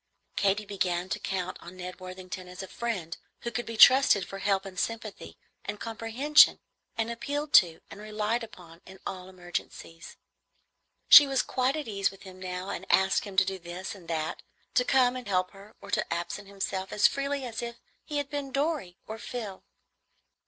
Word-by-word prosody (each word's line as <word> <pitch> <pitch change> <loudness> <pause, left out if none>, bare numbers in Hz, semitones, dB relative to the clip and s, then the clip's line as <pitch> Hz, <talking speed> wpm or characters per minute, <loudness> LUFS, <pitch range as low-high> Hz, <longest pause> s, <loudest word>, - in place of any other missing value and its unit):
Katy 200 +1 +1
began 185 -2 -1
to - - -2
count 185 -1 -3
on 185 +2 -11
Ned 180 +1 -7
Worthington 185 0 -8
as 180 +1 -8
a - - -7
friend 190 -10 -4 0.3
who 235 - -4
could 240 +1 -3
be 230 -1 -5
trusted 250 -6 +7
for 195 - -7
help 195 0 +1
and 185 -2 -6
sympathy 225 -2 -4 0.3
and 205 +1 -5
comprehension, 230 +7 +4 0.4
and 225 +1 -1
appealed 290 +5 -4
to 165 -3 -10
and 205 - -9
relied 215 +2 -1
upon 175 -6 -12
in 190 - -12
all 185 -1 -6
emergencies. 175 -2 -7 0.9
She 290 - +11
was 270 -1 +1
quite 260 +2 0
at 305 -4 -4
ease 200 -2 0
with 195 - -15
him 185 -1 -11
now, 185 +1 -5
and - - -6
asked 190 +2 +3
him 195 -2 -9
to 185 - +6
do 190 0 -4
this 175 +2 -6
and 185 -4 -14
that, 160 -1 -3 0.3
to 250 - +4
come 250 -1 +3
and 250 -3 -6
help 185 -2 +1
her, 200 +1 -15
or 200 0 -10
to - - 0
absent 175 +4 -3
himself, 195 -1 -4
as 210 - +2
freely 280 -1 +1
as 235 -1 -5
if 235 0 -6 0.2
he 295 - -4
had 285 -1 -3
been 285 -2 -4
Dorry 275 - -1
or 220 +1 -7
Phil. 215 -4 -6
200 Hz, 190 wpm, -28 LUFS, 185-235 Hz, 0.9 s, She